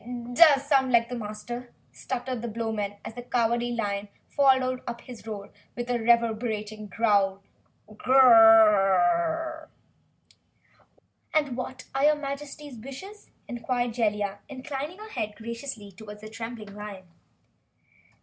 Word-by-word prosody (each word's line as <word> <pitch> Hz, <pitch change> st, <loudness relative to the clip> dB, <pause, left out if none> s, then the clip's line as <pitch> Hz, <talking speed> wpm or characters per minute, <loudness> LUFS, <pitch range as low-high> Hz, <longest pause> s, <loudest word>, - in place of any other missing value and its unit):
"It 245 Hz, 0 st, -7 dB
does 280 Hz, -1 st, +6 dB
sound 270 Hz, -3 st, +3 dB
like 235 Hz, -1 st, +3 dB
the 250 Hz, -, -4 dB
Master," 235 Hz, +2 st, -6 dB, 0.2 s
stuttered 255 Hz, -1 st, -4 dB
the 240 Hz, -, -4 dB
Blowman, 220 Hz, -3 st, -3 dB
as -, -, -6 dB
the 245 Hz, -, -7 dB
Cowardly 240 Hz, 0 st, 0 dB
Lion 205 Hz, -3 st, -2 dB, 0.2 s
followed 260 Hz, -2 st, +3 dB
up 235 Hz, 0 st, -5 dB
his 240 Hz, -3 st, -12 dB
roar 205 Hz, -2 st, -7 dB, 0.2 s
with 245 Hz, 0 st, -4 dB
a 240 Hz, -, +1 dB
reverberating 220 Hz, -2 st, 0 dB
growl. 200 Hz, -2 st, +1 dB, 0.4 s
"What 215 Hz, +1 st, -14 dB
are 230 Hz, -, +5 dB, 2.3 s
your 300 Hz, +1 st, +5 dB
Majesty's 280 Hz, -2 st, -7 dB
wishes?" 325 Hz, -, -10 dB, 0.2 s
inquired 240 Hz, 0 st, -2 dB
Jellia, 210 Hz, -3 st, -1 dB
inclining 280 Hz, +5 st, -6 dB
her 430 Hz, +1 st, -10 dB
head 210 Hz, -, -3 dB
graciously 230 Hz, -2 st, -7 dB
toward 210 Hz, +2 st, -11 dB
the 215 Hz, +1 st, -10 dB
trembling 225 Hz, -2 st, -7 dB
lion. 205 Hz, -2 st, -8 dB
235 Hz, 120 wpm, -27 LUFS, 215-260 Hz, 2.3 s, does